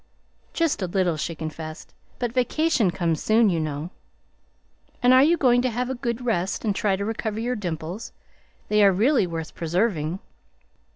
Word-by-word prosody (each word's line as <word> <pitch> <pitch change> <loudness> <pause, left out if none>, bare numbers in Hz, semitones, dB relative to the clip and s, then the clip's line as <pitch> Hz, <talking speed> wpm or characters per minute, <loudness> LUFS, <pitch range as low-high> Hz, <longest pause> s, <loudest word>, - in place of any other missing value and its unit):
"Just 330 -9 0
a 185 - -1
little," 180 -2 +1
she 160 +2 -4
confessed. 155 0 -7 0.2
"But 240 -2 -2
vacation 255 - +2
comes 170 -4 -1
soon, 220 -1 +4
you 170 - 0
know." 155 +2 -4 1.1
"And 250 +1 +6
are 260 - +7
you 330 +5 +4
going 245 -4 +4
to 255 - +1
have 250 +2 -2
a - - -1
good 240 -1 -3
rest 195 -3 -1
and 205 -2 +1
try 200 -1 +1
to 200 +1 -3
recover 220 0 -3
your 245 +2 -1
dimples? 175 +1 -5 0.6
They 210 0 +3
are 200 - +7
really 220 +2 +2
worth 165 -2 -5
preserving." 170 -1 -1
205 Hz, 170 wpm, -24 LUFS, 170-245 Hz, 1.1 s, are